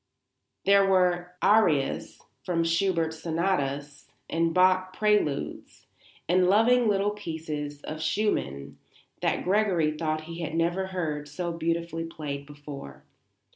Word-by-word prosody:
There 200 0 +6
were 180 -2 +2
Arias 175 -10 +2 0.2
from 170 -2 0
Schubert 165 -1 +1
Sonatas, 160 -4 -2 0.2
and 165 0 +1
Bach 185 +1 +3
Preludes, 210 -10 -1 0.4
and 180 +1 +3
loving 230 +4 +4
little 205 0 +2
pieces 155 -7 -5
of 155 0 -6
Schumann, 70 - -1 0.4
that - - 0
Gregory 185 -5 +2
thought 155 0 -1
he 165 +2 -8
had 165 -1 -3
never 175 +3 0
heard 155 -6 -3
so 175 +3 -3
beautifully 165 0 -2
played 145 -4 -6
before. 145 - -10
165 Hz, 115 wpm, -27 LUFS, 150-185 Hz, 0.4 s, There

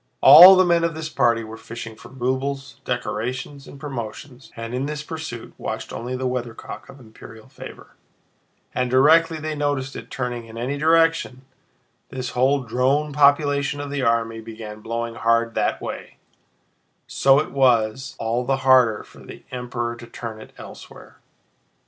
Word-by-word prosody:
All 185 +3 +11
the 185 0 +4
men 170 -1 +2
of 165 -1 -1
this 160 -1 -5
party 115 -5 +1
were 110 0 -9
fishing 110 -1 -9
for - - -14
rubles, 130 +2 -3
decorations, 130 +3 -4
and 140 - -12
promotions, 130 0 -8
and 115 0 -7
in 130 +3 -2
this 150 0 -5
pursuit 155 -7 -7
watched - - -5
only 125 +2 -5
the 130 - -4
weathercock 125 -2 -5
of 135 - -13
imperial 110 0 -14
favor, 130 - -12 0.8
and 125 0 -1
directly 160 +6 +4
they 155 0 -4
noticed 145 -2 -2
it - - -9
turning 120 -2 -4
in 115 0 -11
any 125 +4 -3
direction, 165 -3 +2 0.7
this 130 -2 -5
whole 135 +2 +1
drone 130 +6 0
population 145 0 +2
of 145 -1 -6
the 140 -1 -2
army 115 -2 0
began 110 -1 -9
blowing 115 +1 -4
hard 115 0 +1
that - - 0
way, - - -7 0.9
so 135 0 +3
that 150 - 0
it - - -16
was 130 -1 +1
all 115 +2 -1
the 135 +2 0
harder 125 -4 +4
for - - -18
the - - -12
Emperor 120 -1 -4
to 120 0 -12
turn 115 -2 -8
it - - -13
elsewhere. - - -13
130 Hz, 160 wpm, -22 LUFS, 115-145 Hz, 0.9 s, All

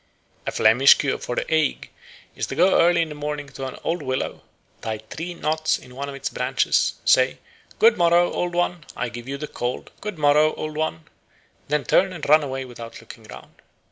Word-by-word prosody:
A - - 0
Flemish 120 +5 +6
cure 140 -2 -1
for 120 - -4
the - - -1
ague 155 -2 0 0.5
is - - -3
to - - -5
go 180 +5 +4
early 170 0 +4
in 160 - -6
the - - -6
morning 150 0 -4
to 135 -1 -6
an 130 - -8
old 170 0 -1
willow, 130 -2 -3 0.4
tie 110 -1 -3
three 165 +11 -7
knots 155 0 0
in 125 - -15
one 140 +1 -4
of 140 - -7
its 140 - -4
branches, 125 +2 +1
say, - - +4 0.4
"Good 460 +2 +5
morrow, 175 +1 +4
Old 175 -1 -2
One, 175 -1 0
I 125 - -2
give 120 0 -8
thee 135 - -3
the 150 +2 -5
cold; 120 -2 -4
good 210 -4 -5
morrow, 150 +1 +4
Old 155 0 -5
One," 155 - -2 0.6
then 150 0 0
turn 190 0 +2
and 165 -5 -6
run 155 +2 +6
away 135 -2 -4
without 120 -2 -10
looking - - -13
round. - - -13
150 Hz, 205 wpm, -23 LUFS, 130-165 Hz, 0.6 s, Flemish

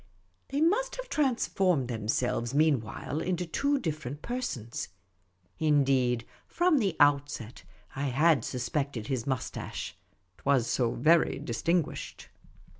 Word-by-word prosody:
They 280 +2 -2
must 435 +10 +2
have - - -7
transformed 195 - +1
themselves 120 +2 -1
mean 150 -3 +4
while 125 +7 -5
into 180 -1 -1
two 280 - +1
different 150 - -4
persons. 130 - -4 0.7
Indeed, 135 -6 +2 0.2
from 345 -4 +3
the 200 -5 0
outset, 145 - +2 0.3
I 140 +1 -2
had 140 0 +3
suspected 125 -2 -3
his 130 -3 -2
moustache 130 -7 -4 0.2
— - - -44
't - - -22
was 135 -4 +3
so 120 -1 0
very 165 +1 +4
distinguished. 165 +8 -2
145 Hz, 120 wpm, -29 LUFS, 125-180 Hz, 0.7 s, mean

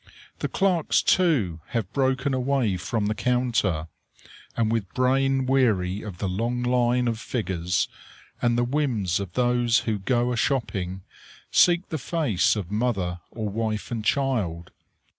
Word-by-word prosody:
The - - -1
clerks, 185 -5 +1
too, 130 - +2 0.2
have 110 -3 -3
broken 135 0 +1
away 130 -5 +1
from 105 +5 -2
the 105 - 0
counter, 115 -10 0 0.7
and 110 -1 +1
with 110 -5 -1
brain 135 +1 +2
weary 105 -8 +2
of 100 -5 -8
the 100 - -2
long 115 +6 -1
line 125 0 +2
of 115 -2 -1
figures, 95 -7 -1 0.5
and 120 -1 +2
the 120 - +2
whims 120 - 0
of 95 -3 -6
those 120 -1 +2
who 110 -2 -2
go 120 +4 +1
a - - -1
shopping, 95 -9 -1 0.5
seek 175 +1 +4
the 160 - -3
face 130 - +1
of 100 -3 -5
mother, 100 -6 -1
or 110 -2 -4
wife 110 +1 -3
and 115 -2 -3
child. 105 -11 -1
115 Hz, 145 wpm, -25 LUFS, 100-130 Hz, 0.7 s, seek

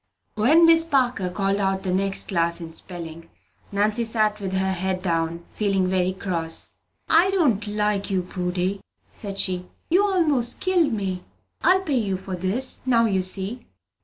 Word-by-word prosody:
When 295 +10 +5
Miss 330 0 +6
Parker 255 - 0
called 195 +2 -1
out 195 -1 -1
the 185 -2 -1
next 195 +1 +1
class 170 -2 0
in 165 -1 -8
spelling, 165 -1 -9 0.4
Nannie 210 +3 +1
sat 215 -2 0
with 190 -1 -4
her 190 0 +1
head 185 0 -2
down, 170 -1 -1
feeling 195 -3 0
very 185 0 +1
cross. 170 -4 -2 0.4
"I 335 +4 +4
don't 275 - +1
like 210 -1 -1
you, 190 -2 0
Prudy," 180 +2 -2 0.3
said 200 -2 -6
she. 180 -2 0 0.2
"You 375 -1 +3
'most 245 -5 +1
killed 355 -6 +2
me! 190 -4 -3 0.4
I'll 375 +1 +4
pay 290 -8 0
you 195 -4 -1
for 190 0 -6
this, 190 +9 +1
now 235 -3 +3
you 195 -4 +1
see!" 195 +6 -1
195 Hz, 165 wpm, -23 LUFS, 185-240 Hz, 0.4 s, Miss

